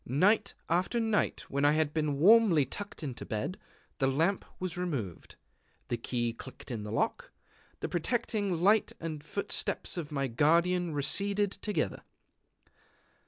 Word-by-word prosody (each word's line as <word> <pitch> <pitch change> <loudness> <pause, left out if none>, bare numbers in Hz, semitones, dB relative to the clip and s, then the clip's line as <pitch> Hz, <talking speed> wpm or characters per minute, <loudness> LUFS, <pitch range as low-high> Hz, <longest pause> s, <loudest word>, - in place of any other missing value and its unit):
Night 200 - +3
after 180 +8 +1
night 220 -2 +1
when 140 +1 -2
I 145 +1 +5
had 155 -1 +1
been 150 -3 0
warmly 190 -3 +6
tucked 200 +7 -7
into 130 -5 -5
bed, 110 - -3 0.4
the 135 - +3
lamp 165 +9 +1 0.2
was 185 -2 -3
removed; 140 - -4 0.5
the 120 - 0
key 120 0 -1
clicked 130 +2 -10
in 115 -3 -3
the 105 0 -6
lock; 115 - -1 0.5
the - - -1
protecting 205 0 -1
light 210 +2 +4
and 160 -2 -4
the - - -24
footsteps 200 +1 -2
of 160 -3 -4
my 140 -2 0
guardian 170 +7 +2
receded 200 +7 +1
together. 200 -8 -2
165 Hz, 145 wpm, -31 LUFS, 140-200 Hz, 0.5 s, warmly